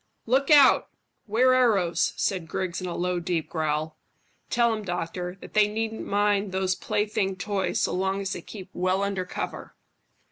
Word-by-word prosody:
"Look 265 +4 +2
out! 290 -3 +7 0.4
'Ware 250 +5 +4
arrows," 210 -9 +2
said 185 -4 -1
Griggs, 185 +2 -3
in 185 - -4
a 175 - -4
low, 180 0 -1
deep 170 -2 -2
growl. 155 -1 -2 0.5
"Tell 235 -1 +3
'em, 215 -1 -4
doctor, 180 0 -4
that - - -11
they 210 -1 +5
needn't 220 +1 -3
mind 205 -1 +1
those 190 0 0
plaything 205 0 -1
toys 195 +1 -1
so - - 0
long 190 +1 0
as 195 -1 -3
they - - -6
keep 190 -3 -10
well 185 +2 0
under 195 -2 -2
cover." - - -6
195 Hz, 170 wpm, -26 LUFS, 180-210 Hz, 0.5 s, out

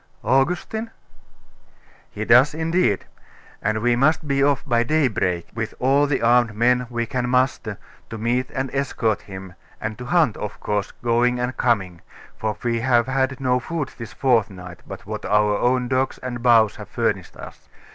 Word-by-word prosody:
'Augustine?' 175 - 0 1.2
'He 110 - -5
does 125 +6 +5
indeed; 165 - +1 0.6
and 110 +1 -1
we 120 0 +3
must 155 +5 +2
be 140 0 +1
off 140 -2 +1
by 120 -1 +2
daybreak, 115 - 0
with 110 0 -4
all 140 +3 +3
the 140 -4 -1
armed 120 -2 +3
men 125 +2 +2
we 120 -1 -2
can 125 +1 -2
muster, 125 -4 0 0.3
to 115 - -6
meet 120 +3 -1
and 135 -1 -3
escort 125 -6 -1
him, 95 -2 -10 0.3
and 110 +1 -5
to 125 - -6
hunt, 155 -6 +2
of 105 0 -6
course, 105 -1 -2
going 120 +1 +2
and 125 +1 -2
coming; 95 -8 0 0.3
for 110 -1 -3
we 120 -1 0
have 120 -1 +3
had 130 +1 -1
no 125 -1 +1
food 155 -1 -4
this 115 - -7
fortnight, 100 -9 0
but - - -9
what - - -6
our 105 0 +2
own 125 0 +1
dogs 130 +1 0
and 125 -2 -6
bows 115 -3 +4
have - - -10
furnished - - -2
us. - - -12
120 Hz, 165 wpm, -22 LUFS, 110-130 Hz, 1.2 s, does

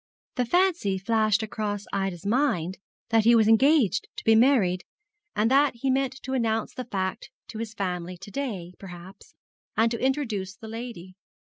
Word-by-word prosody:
The 250 -2 -1
fancy 345 - +2
flashed 215 +2 +1
across 205 -2 -3
Ida's 195 -2 -2
mind 200 - 0 0.3
that 225 -1 +4
he 235 +2 +6
was 220 -2 +4
engaged 225 - +4
to - - -7
be 225 - +5
married, 220 -7 +4 0.5
and 220 +3 +2
that 280 -1 +4
he 265 +3 0
meant 265 0 -1
to 265 - -4
announce 225 -3 0
the 255 - -6
fact 190 -4 -3 0.2
to 220 - -7
his 220 -2 -5
family 180 -2 -3
to 195 +3 -11
day, 200 -11 -4
perhaps, 185 0 -12 0.4
and 225 +1 +3
to 230 - -3
introduce 225 -9 -1
the 220 - -11
lady. 225 -5 -7
220 Hz, 170 wpm, -26 LUFS, 195-250 Hz, 0.5 s, he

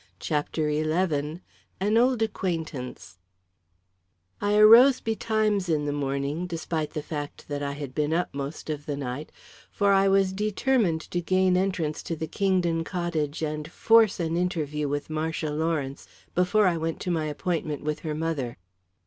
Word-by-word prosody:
CHAPTER 150 +5 -1
XI 155 0 0 0.4
An 205 +3 +1
Old 240 0 +3
Acquaintance 160 - -4 1.2
I 205 +1 +2
arose 235 +5 +8
betimes 215 -4 0
in 150 -2 +1
the 145 - -1
morning, 140 +4 -2
despite 160 -2 -3
the 150 - -3
fact 145 -2 -6
that 145 0 -3
I 140 0 -2
had 140 -2 -6
been 150 +1 0
up 175 +2 0
most 140 +3 -5
of 150 -1 -6
the 145 -2 -2
night, 140 +2 -5 0.4
for 200 -1 +2
I 195 0 +4
was 195 -1 +3
determined 210 -3 +1
to 175 +2 -3
gain 185 +1 +2
entrance 180 -5 0
to 165 - -4
the 160 - -4
Kingdon 180 -3 +1
cottage 165 -4 -2
and 155 0 -3
force 225 -2 +4
an 165 -1 -1
interview 155 -5 -1
with 145 +2 -3
Marcia 155 0 -2
Lawrence 150 -3 -2 0.3
before 200 +4 +3
I 175 -2 +2
went 165 0 -3
to 180 - -2
my 160 -2 0
appointment 155 -1 -2
with 150 0 -2
her 155 -2 -4
mother. 155 -6 -2
160 Hz, 155 wpm, -26 LUFS, 150-190 Hz, 1.2 s, arose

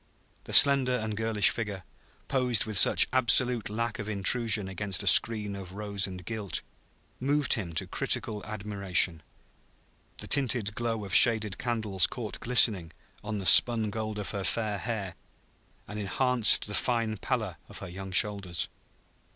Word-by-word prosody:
The - - -10
slender 135 -3 +6
and 110 -3 -4
girlish 110 -2 +2
figure, 105 -5 -6 0.4
posed 125 -4 0
with 110 -1 -6
such 95 - +6
absolute 125 -2 +2
lack 115 +1 -5
of 105 0 -6
intrusion 105 0 +2
against 95 -1 -4
a - - -9
screen 105 -3 +3
of 95 -2 -10
rose 100 -1 -3
and 90 -1 -11
gilt, 110 -3 -6 0.6
moved 140 +1 0
him 95 -7 -3
to 80 - -2
critical 105 -2 -2
admiration. 100 -5 -1 1.0
The - - -6
tinted 120 -6 0
glow 115 -2 -4
of 95 - -9
shaded 110 -4 +4
candles 110 -6 0
caught 115 -5 -8
glistening 105 -8 +2 0.3
on 105 0 -5
the 95 - -7
spun 110 +1 +5
gold 110 0 -6
of 105 - -5
her 100 -2 -5
fair 105 -1 -2
hair, 105 -5 -5 0.7
and 105 +1 -8
enhanced 120 +3 +2
the 105 - -8
fine 115 -2 -2
pallor 110 -6 -4
of 100 - -11
her 95 - -9
young 95 +2 -10
shoulders. 100 -3 0
105 Hz, 150 wpm, -27 LUFS, 100-115 Hz, 1.0 s, slender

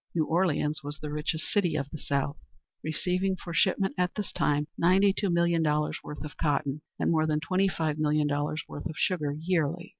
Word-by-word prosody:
New 160 -2 +2
Orleans 160 -3 +1
was 145 +1 -5
the 150 -1 -6
richest 155 +2 -2
city 180 -6 +1
of 140 -1 -2
the 155 - -6
South, 140 0 -1 0.5
receiving 180 +4 0
for 175 -2 -8
shipment 190 +2 +2
at 180 0 +1
this 210 -3 -3
time 150 0 +1
ninety 190 +3 +4
two 200 0 -1
million 170 -1 +3
dollars 150 -1 +1
worth 150 0 -7
of 150 - -9
cotton, 145 -1 0 0.2
and - - +1
more 155 -1 +3
than 150 -1 +1
twenty 185 +4 +1
five 160 -4 -1
million 150 0 +2
dollars 145 +1 -1
worth 145 - -5
of 160 - -7
sugar 155 -6 +1
yearly. 165 +1 -1
155 Hz, 200 wpm, -28 LUFS, 150-180 Hz, 0.5 s, ninety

